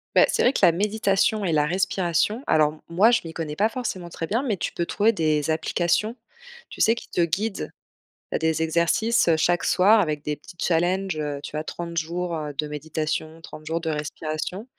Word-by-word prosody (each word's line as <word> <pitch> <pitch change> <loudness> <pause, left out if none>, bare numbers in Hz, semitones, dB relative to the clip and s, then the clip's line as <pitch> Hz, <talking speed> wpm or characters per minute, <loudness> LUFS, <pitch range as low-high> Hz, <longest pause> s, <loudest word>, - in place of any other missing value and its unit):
Bah, - - +7
c'est - - +1
vrai 250 - +4
que - - -1
la - - +8
méditation 205 +3 +1
et 175 - 0
la 150 -2 +3
respiration, 185 +5 0
alors 155 -1 +4
m 155 - -16
moi 195 +8 +4
je 235 - +4
m'y 165 - -7
connais 155 -2 -5
pas 210 - +3
forcément 220 -7 -4
très 165 -1 -5
bien, 230 - 0
mais 225 -7 0
tu - - -3
peux 170 - -2
trouver 215 +5 +2
des 155 -5 0
applications, 175 +7 0 0.5
tu - - -11
sais 225 - +4
qui - - -10
te - - -3
guident. 195 +6 -1 0.6
Heu, - - +2
des 160 0 0
exercices, 170 +9 +2
heu, 165 - +5
chaque 175 +2 +1
soir 210 +4 +5
avec 150 -5 -1
des 150 0 -2
petits 175 +4 -14
challenges, 180 +1 +1
heu, 145 -2 -3
tu 150 - -5
as 155 - -2
30 170 0 -6
jours, 170 +2 -2
heu, 150 -1 -5
de 150 +2 -2
méditation, 155 +1 -4
30 155 -1 -11
jours 165 +1 -2
de 165 - -3
respiration 155 +5 -4
170 Hz, 210 wpm, -24 LUFS, 155-200 Hz, 0.6 s, la